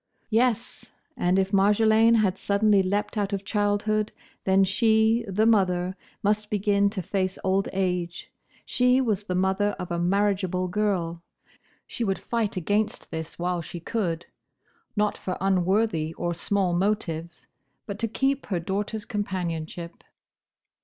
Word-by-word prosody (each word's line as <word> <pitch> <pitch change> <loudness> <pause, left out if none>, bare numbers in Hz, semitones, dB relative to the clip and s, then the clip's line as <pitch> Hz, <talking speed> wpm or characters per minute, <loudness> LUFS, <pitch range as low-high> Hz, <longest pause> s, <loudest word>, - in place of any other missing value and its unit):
Yes! 235 +1 +1 0.3
and 180 +1 +1
if 190 0 +1
Marjolaine 220 +3 +5
had 205 -4 +2
suddenly 200 0 +3
leapt 205 +3 -1
out 200 0 -1
of 195 0 -3
childhood, 210 +1 0 0.3
then 190 0 +4
she, 220 +3 +3
the 205 +3 +1
mother, 185 -4 +2 0.3
must 210 +1 +1
begin 200 -1 +2
to 195 -3 -4
face 185 +1 -1
old 190 +1 +1
age: 180 -3 -2 0.3
she 250 +1 +3
was 215 -6 0
the 180 - -2
mother 190 +2 +1
of 180 -1 -6
a 170 - -1
marriageable 185 0 +1
girl. 180 -4 -1 0.6
She 240 - -4
would 195 -3 0
fight 230 -5 -2
against 205 +4 -1
this 160 0 -6
while 175 0 -1
she 170 +1 -7
could; 170 -3 -2 0.7
not 210 -1 0
for 185 - -4
unworthy 190 -3 +1
or 175 0 -2
small 185 +1 0
motives, 175 -3 -2 0.4
but 200 -1 -6
to 230 - 0
keep 270 +5 -1
her 185 -4 -1
daughter's 205 +4 -3
companionship. 175 -6 -4
195 Hz, 140 wpm, -26 LUFS, 180-215 Hz, 0.7 s, Marjolaine